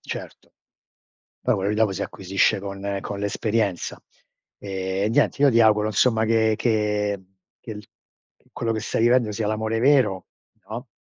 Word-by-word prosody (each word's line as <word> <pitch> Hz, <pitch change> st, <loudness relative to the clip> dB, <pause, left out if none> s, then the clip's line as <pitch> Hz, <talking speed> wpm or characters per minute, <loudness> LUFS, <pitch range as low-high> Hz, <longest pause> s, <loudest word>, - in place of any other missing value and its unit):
certo. -, -, -8 dB, 0.9 s
Poi -, -, +2 dB
quello 95 Hz, +1 st, -1 dB
lì 105 Hz, -, 0 dB
dopo 110 Hz, -2 st, +2 dB
si 95 Hz, +1 st, -4 dB
acquisisce 95 Hz, +1 st, 0 dB
con 100 Hz, 0 st, -4 dB
con 100 Hz, -1 st, -5 dB
l'esperienza. 105 Hz, -1 st, -1 dB, 0.6 s
Ehm, 95 Hz, +1 st, -2 dB
niente, 130 Hz, -, +2 dB
io 145 Hz, -, +7 dB
ti 115 Hz, -, +3 dB
auguro, 110 Hz, -1 st, +4 dB
insomma, 110 Hz, +1 st, +2 dB
che 110 Hz, -1 st, +3 dB
che 105 Hz, -3 st, 0 dB, 0.4 s
che 110 Hz, -, -8 dB
l 105 Hz, -, -9 dB, 0.7 s
quello 115 Hz, -, -2 dB
che 110 Hz, -, -2 dB
stai 110 Hz, -, -2 dB
vivendo 120 Hz, -2 st, +3 dB
sia 105 Hz, 0 st, -2 dB
l'amore 110 Hz, +1 st, -1 dB
vero, 125 Hz, -8 st, +3 dB, 0.4 s
no. 120 Hz, +4 st, -6 dB
105 Hz, 150 wpm, -23 LUFS, 100-115 Hz, 0.9 s, io